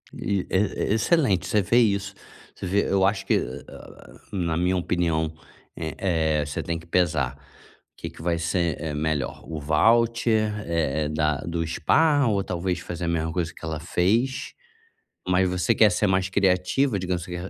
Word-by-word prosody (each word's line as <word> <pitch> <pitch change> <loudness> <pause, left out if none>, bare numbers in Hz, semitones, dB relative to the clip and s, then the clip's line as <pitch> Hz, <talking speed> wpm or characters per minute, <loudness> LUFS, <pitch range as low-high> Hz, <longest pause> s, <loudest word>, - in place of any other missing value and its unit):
E 100 -2 -1
é 95 - +2 0.3
é - - +3
excelente. 110 - +2
Você 105 +1 +2
vê 115 +6 +2
isso, 100 -3 +1 0.4
você - - -7
vê 100 +3 +1
eu 95 -1 +3
acho 95 0 0
que, - - +2
hã 65 - -5
hã, - - -13 0.2
na 85 -5 -1
minha 90 +2 +1
opinião, 80 -3 0 0.4
eh 80 -4 -5 0.5
eh, 75 - -2
você 75 - -4
tem 85 -1 -3
que 80 - -15
pesar 80 -7 +1
o 70 -1 -25
que - - -4
que - - -13
vai 85 0 0
ser, 85 -1 -1
eh, 80 -1 -4
melhor. 75 -2 -2
O 80 -2 -5
voucher, 110 +6 +2
eh 80 -3 0
eh, 75 - -2
da 75 -1 0
do 85 0 -2
Spa, 145 - +3
ou, 100 -3 +1
talvez, 90 0 -2
fazer 85 0 -5
a - - -2
mesma 80 -1 -1
coisa 85 -1 -2
que - - -10
ela 80 -1 -3
fez, 110 - 0 0.7
mas 90 0 +3
você 90 +5 +1
quer 110 -1 +5
ser 105 +4 +1
mais 95 0 +1
criativa, 100 +5 +1
digamos 90 -2 -2
que 90 -1 -6
90 Hz, 185 wpm, -25 LUFS, 80-100 Hz, 0.7 s, quer